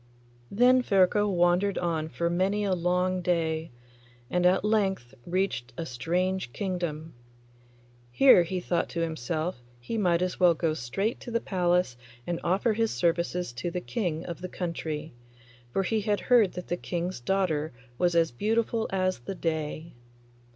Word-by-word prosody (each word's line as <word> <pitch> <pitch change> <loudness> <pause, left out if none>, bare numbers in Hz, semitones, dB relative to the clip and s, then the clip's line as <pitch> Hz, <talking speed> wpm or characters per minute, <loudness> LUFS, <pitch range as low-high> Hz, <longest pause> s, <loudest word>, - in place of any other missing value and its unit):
Then 250 +4 +5
Ferko 205 -1 +3
wandered 180 +2 +2
on 160 -3 -1
for 170 +1 -2
many 190 +4 +1
a 195 -2 +1
long 180 +1 +1
day, 165 -2 0 0.6
and 180 0 +3
at 185 +3 +2
length 195 - 0
reached 175 -9 -1
a 165 - -3
strange 175 +4 -1
kingdom. 170 -5 -3 1.0
Here, 255 - +7
he 180 +2 -2
thought 175 -1 -1
to 170 - -3
himself, 160 -1 -2 0.2
he 220 - -3
might 175 -3 +2
as 185 - -3
well 175 -2 +5
go 160 -1 0
straight 160 - -2
to - - -9
the 230 0 0
palace 180 - +1 0.3
and 175 -1 -2
offer 195 +6 +2
his 225 +1 +1
services 175 - 0
to 155 +8 -3
the 180 - -3
King 175 -5 -3
of 170 - -6
the 185 - -5
country, 160 -4 -4 0.6
for 195 - 0
he 220 +2 0
had 205 -1 0
heard 235 -7 +4
that 180 - -7
the 175 - 0
King's 175 -1 -3
daughter 160 +1 0 0.3
was 175 -1 +2
as 165 -3 +3
beautiful 225 - 0
as 185 -5 0
the 155 +11 -6
day. 160 -1 -3
180 Hz, 160 wpm, -28 LUFS, 165-195 Hz, 1.0 s, Here